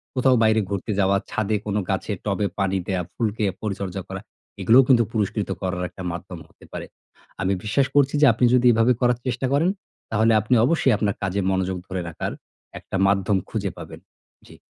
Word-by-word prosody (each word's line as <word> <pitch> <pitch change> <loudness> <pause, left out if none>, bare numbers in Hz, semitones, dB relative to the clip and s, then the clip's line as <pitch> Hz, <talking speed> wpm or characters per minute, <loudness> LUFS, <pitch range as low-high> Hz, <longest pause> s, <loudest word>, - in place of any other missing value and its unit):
কোথাও 130 0 +4
বাইরে 110 0 +4
ঘুরতে 100 +2 -3
যাওয়া, 100 0 +3
ছাদে 110 0 -1
কোন 105 -1 -2
গাছে - - -2
টবে 105 - 0
পানি 95 -1 +1
দেয়া, 95 -2 -1
ফুলকে 110 -2 -1 0.2
পরিচর্যা 100 -2 -4
করা। - - -6 0.4
এগুলোও 125 +4 +6
কিন্তু 125 -3 +5
পুরস্কৃত 105 -2 -1
করার 90 -1 -2
একটা 95 - -10
মাধ্যম 85 0 -7
হতে - - -19
পারে। - - -5 0.6
আমি 95 0 +1
বিশ্বাস 130 +6 +1
করছি 140 -1 +4
যে - - +7
আপনি 120 +3 +2
যদি 125 0 +4
এভাবে 115 +2 +4
করার 120 -1 +3
চেষ্টা 125 +1 -1
করেন, 160 +6 +3 0.4
তাহলে 110 +1 +3
আপনি 110 +4 +1
অবশ্যই 135 -4 +3
আপনার 100 -2 0
কাজে 95 +1 -1
মনোযোগ 95 0 -1
ধরে 95 -1 -3
রাখার 80 - -4 0.5
একটা - - -8
মাধ্যম 100 0 +2
খুঁজে - - -2
পাবেন। - - -9 0.5
জী। - - -14
105 Hz, 180 wpm, -23 LUFS, 95-120 Hz, 0.6 s, যে